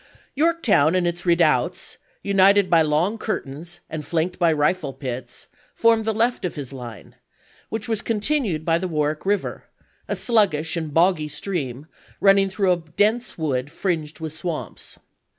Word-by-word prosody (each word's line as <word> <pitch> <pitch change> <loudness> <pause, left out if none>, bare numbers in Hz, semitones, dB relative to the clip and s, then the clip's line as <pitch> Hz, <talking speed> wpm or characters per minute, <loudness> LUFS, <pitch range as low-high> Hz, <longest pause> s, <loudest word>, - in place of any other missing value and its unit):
Yorktown 275 - +3
and 180 -1 +2
its 175 +1 -4
redoubts, 170 0 +1 0.2
united 195 -1 +4
by 165 -1 +6
long 160 +8 +1
curtains 170 -4 -5
and 155 -1 -5
flanked 170 +4 -2
by 170 -2 +4
rifle 150 -1 0
pits, 125 -3 -6 0.3
formed 230 -1 +3
the 220 - +2
left 230 +3 0
of 180 - -3
his 140 -3 -7
line, 120 -6 -9 0.6
which 220 -1 -3
was 220 -2 -1
continued 215 - -1
by 165 0 +2
the 185 - -2
Warwick 155 +1 -2
River, 200 -1 -1 0.4
a - - -1
sluggish 180 -10 +2
and 160 -3 -3
boggy 165 0 +3
stream 145 -6 -4 0.3
running 195 0 +5
through 190 -1 +1
a 180 - +3
dense 205 +9 -1
wood 145 -4 -2
fringed 165 -4 -3
with 160 -1 -6
swamps. 165 0 -6
175 Hz, 150 wpm, -23 LUFS, 150-200 Hz, 0.6 s, by